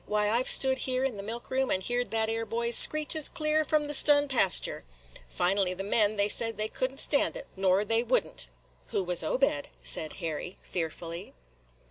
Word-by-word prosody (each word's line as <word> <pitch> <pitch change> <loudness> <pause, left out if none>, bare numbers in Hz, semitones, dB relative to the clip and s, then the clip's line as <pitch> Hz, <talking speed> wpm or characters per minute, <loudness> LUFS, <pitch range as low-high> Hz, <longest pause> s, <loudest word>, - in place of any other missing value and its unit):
Why, 210 0 +1
I 235 +2 +2
've - - +1
stood 265 -1 +4
here 255 0 -1
in 265 -4 -2
the - - -6
milk 230 +5 -7
room 265 0 0
and 185 - -1
heerd 245 +2 -2
that 220 0 0
'ere 225 +1 -2
boy's 235 +2 -1
screeches 310 0 +4
clear 305 0 0
from 305 -1 0
the 295 - -2
stun 290 0 +5
pastur' 235 -9 +2 0.5
.Finally 185 - 0
the 195 - -5
men, 210 +1 +2
they 200 0 +2
said 225 +1 -1
they 215 0 -2
could 255 +3 -3
n't 275 - -9
stan' 285 - +1
it, - - -8
nor 190 +1 +1
they 225 +2 +1
would - - +1
n't." - - -5 0.4
"Who 195 - -2
was 175 -1 -2
Obed?" 160 - -1 0.2
said - - -1
Harry, 165 +1 -6
fearfully. 170 - -6
225 Hz, 200 wpm, -28 LUFS, 190-265 Hz, 0.5 s, stun